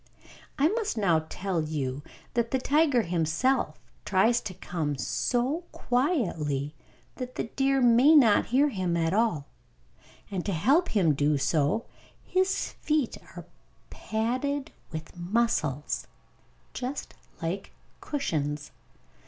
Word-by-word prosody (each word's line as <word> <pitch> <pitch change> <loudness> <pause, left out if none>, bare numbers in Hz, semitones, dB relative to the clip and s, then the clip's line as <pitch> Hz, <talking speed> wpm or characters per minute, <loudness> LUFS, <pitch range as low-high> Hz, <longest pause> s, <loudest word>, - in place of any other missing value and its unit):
I 285 - +4
must 435 - -1
now 165 -6 +2
tell 185 -3 -2
you 145 -3 -3 0.3
that 235 -1 +1
the 265 - +1
tiger 285 -2 +3
himself, 170 - 0 0.2
tries 225 +5 +3
to 185 - -6
come 155 -6 -3
so 245 - -1
quietly 170 - 0 0.4
that 255 0 -6
the - - -1
deer 270 +3 +1
may 245 +6 +6
not 230 -8 +6
hear 275 +5 +3
him 185 -7 -1
at 165 +1 +1
all; 205 -10 +1 0.9
and 185 -3 -2
to 200 - -2
help 275 - +3
him 190 -7 +3
to - - +4
do 150 0 +3
so, 150 +8 +1 0.4
his 375 +1 0
feet 300 -5 +1 0.2
are - - -7 0.5
padded 260 +7 -2 0.2
with 160 0 -7
muscles, 175 - -1 0.7
just 260 +3 -5 0.3
like 170 +4 -4 0.3
cushions. 150 - -2
215 Hz, 120 wpm, -28 LUFS, 160-265 Hz, 0.9 s, may